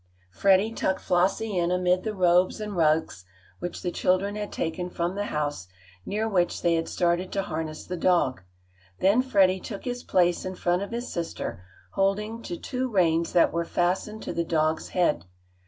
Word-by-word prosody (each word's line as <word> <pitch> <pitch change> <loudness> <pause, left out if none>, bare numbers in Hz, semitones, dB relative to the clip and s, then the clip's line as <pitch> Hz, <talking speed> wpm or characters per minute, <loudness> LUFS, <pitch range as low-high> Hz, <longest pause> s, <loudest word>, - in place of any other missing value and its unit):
Freddie 195 - +3
tucked 190 -4 0
Flossie 195 +4 +1
in 170 0 +1
amid 180 0 +2
the 215 0 -4
robes 180 +1 +3
and 210 -2 -5
rugs 155 - +1 0.4
which 175 -1 -5
the 180 - -1
children 190 +4 +1
had 210 -1 -4
taken 175 +2 -3
from 175 0 -2
the 205 +1 -2
house, 145 - -3 0.4
near 215 +2 -1
which 180 -5 0
they 170 - +3
had 165 0 -1
started 175 +1 0
to 195 - -1
harness 155 -2 -5
the 180 - -4
dog. 170 -7 +2 0.6
Then 200 +6 +4
Freddie 195 -7 +3
took 200 +2 -7
his 245 -1 -3
place 175 -5 +2
in 185 0 -5
front 175 +1 0
of 200 - -4
his 240 +1 -5
sister, 170 - -4 0.3
holding 210 +4 0
to 175 -6 -5
two 255 +5 -3
reins 170 -5 +2
that 170 - +4
were 170 0 0
fastened 185 +5 -1
to - - -4
the 170 - 0
dog's 160 -1 0
head. 170 - +1
180 Hz, 180 wpm, -26 LUFS, 170-200 Hz, 0.6 s, Then